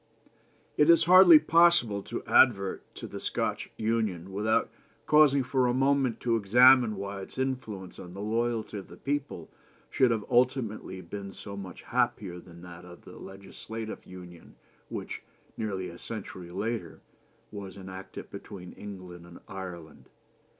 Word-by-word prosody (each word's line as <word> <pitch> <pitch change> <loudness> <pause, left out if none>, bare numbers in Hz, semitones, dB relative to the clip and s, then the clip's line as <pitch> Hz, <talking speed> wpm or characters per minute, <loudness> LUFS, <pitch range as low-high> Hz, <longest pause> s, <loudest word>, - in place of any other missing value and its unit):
"It 150 - +4
is 170 0 +7
hardly 180 -1 +9
possible 155 -9 +4
to - - -5
advert 100 -7 +4
to - - -8
the - - -7
Scotch - - -2
Union, 110 -5 -1
without 110 +3 +1 0.3
pausing 145 -3 +5
for 130 0 +1
a 120 - +1
moment 135 -2 +2
to 115 -2 +1
examine 120 +2 +6
why 100 0 -5
its 95 - -10
influence 120 -8 -4
on 90 - -10
the 100 - -9
loyalty 110 0 -2
of 95 - -11
the - - -13
people 140 - -4 0.4
should 130 - +3
have 110 -3 -1
ultimately 120 -6 0
been 100 +2 -8
so 100 -1 -9
much 95 -3 -9
happier 90 -4 -1
than 85 0 -14
that 90 0 -11
of 90 -1 -13
the - - -12
legislative 110 +3 -8
union 90 -2 -12 0.3
which, - - -6 0.3
nearly 95 -4 -3
a 85 - -10
century 95 -5 -8
later, 110 +6 -4 0.5
was 100 -2 -8
enacted 95 0 -9
between 90 -4 -9
England 90 -4 -10
and 85 - -13
Ireland. 90 -5 -9
105 Hz, 145 wpm, -28 LUFS, 95-125 Hz, 0.5 s, hardly